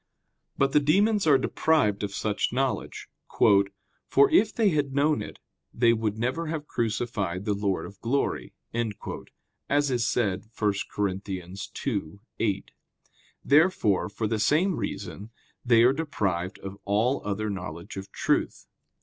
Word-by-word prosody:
But 140 0 +2
the 150 - +5
demons 200 +6 +3
are 145 -3 +7
deprived 130 -6 +1
of 100 - -2
such 105 0 -1
knowledge: 130 +1 -2 1.0
"for 140 +1 +5
if 215 +1 +4
they 220 -3 +2
had 145 -5 -1
known 145 -4 +2
it, - - -8 0.3
they 115 0 +3
would 110 -2 -1
never 130 +8 -1
have 155 -1 -3
crucified 110 -7 -2
the 105 - +1
Lord 100 -2 -1
of 100 -1 -12
glory," 115 - -1 1.1
as 145 -1 +2
is 120 -2 +1
said 105 -4 0
1 105 -2 +2 0.2
Cor. 105 - 0
2:8. 100 - -4 0.8
Therefore, 145 - +3
for 110 - -3
the 110 0 0
same 170 - +2
reason, 100 +1 -5 0.3
they 115 -2 +5
are 125 +2 +5
deprived 100 - -2
of 95 +1 -8
all 110 +7 +1
other 105 +1 -2
knowledge 90 -3 -7
of 95 0 -7
truth. - - 0
115 Hz, 135 wpm, -27 LUFS, 100-140 Hz, 1.1 s, are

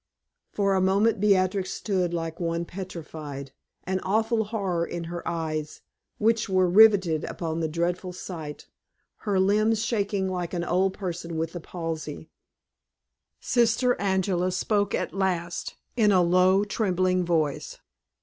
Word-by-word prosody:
For 200 -1 +1
a 190 - +2
moment 200 +4 +3
Beatrix 190 -2 +2
stood 185 -4 -1
like 165 -1 -4
one 170 0 -1
petrified, 155 -7 -7 0.3
an 190 +1 -1
awful 220 +3 +1
horror 195 -6 -1
in 170 0 -4
her 170 +1 -5
eyes, 155 -3 -3 0.4
which 225 0 +1
were 185 -1 +3
riveted 190 -5 +5
upon 165 -1 -4
the 160 - 0
dreadful 175 +3 -2
sight, 165 -5 -7 0.6
her 195 -2 +2
limbs 215 +3 +2
shaking 200 -3 0
like 180 -1 -3
an 170 - -1
old 185 +2 +1
person 170 -3 -5
with 165 0 -2
the 175 - -5
palsy. 160 -3 -6 1.1
Sister 240 +1 +2
Angela 190 -2 +1
spoke 205 +2 0
at - - -3
last 180 -3 -2 0.2
in 215 -4 +4
a 185 -2 +5
low, 185 +3 +4
trembling 185 -3 +1
voice. 170 - -1
185 Hz, 135 wpm, -26 LUFS, 170-200 Hz, 1.1 s, riveted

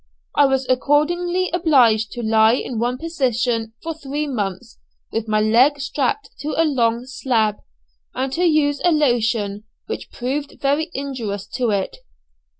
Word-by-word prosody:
I 285 - +5
was 265 -1 0
accordingly 345 +7 +1
obliged 250 - +3
to 240 - -5
lie 220 +1 +4
in 245 -3 -4
one 245 +2 0
position 245 -7 -1
for 330 0 -3
three 295 -1 -4
months 200 - -4 0.3
with 225 0 -2
my 215 0 +2
leg 250 +7 +4
strapped 280 +9 -2
to 305 +2 -3
a 330 - +5
long 240 -5 +1
slab, 230 -5 0 0.6
and 260 +1 -2
to 350 - 0
use 305 -4 +2
a 350 - +4
lotion 225 -8 +1 0.2
which - - -6
proved 280 +4 -4
very 290 +4 0
injurious 235 -8 -4
to 245 -2 -1
it. 200 -2 -1
260 Hz, 150 wpm, -21 LUFS, 225-295 Hz, 0.6 s, I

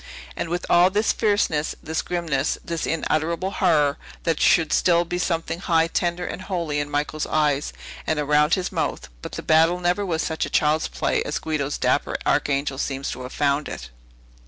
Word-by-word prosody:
And, 165 - -3
with 175 +1 -2
all 175 +1 +5
this 210 +3 +2
fierceness, 205 -8 +1
this 160 0 -2
grimness, 160 -6 -1
this 170 -1 -3
unutterable 165 +3 -1
horror, 150 -8 +2 0.2
there 165 - +2
should 160 +1 +3
still 175 -1 +3
be 175 +1 -3
something 165 -1 -1
high, 165 -3 +2
tender, 175 +1 -1
and - - -5
holy 170 -6 -2
in 145 0 -3
Michael's 150 +1 -2
eyes, 150 -2 +1 0.4
and 155 - +1
around 150 +1 +3
his 185 -1 -3
mouth. - - -2
But - - -8
the - - -5
battle 165 +3 +4
never 180 +3 +1
was 165 -4 -1
such 160 -1 -2
a - - -2
child's 155 +1 +2
play - - -1
as - - -2
Guido's 145 -3 -2
dapper - - +1
Archangel 140 -1 0
seems 135 -1 -2
to - - -6
have 125 +1 -7
found 145 0 0
it." - - -8
160 Hz, 180 wpm, -23 LUFS, 150-175 Hz, 0.4 s, all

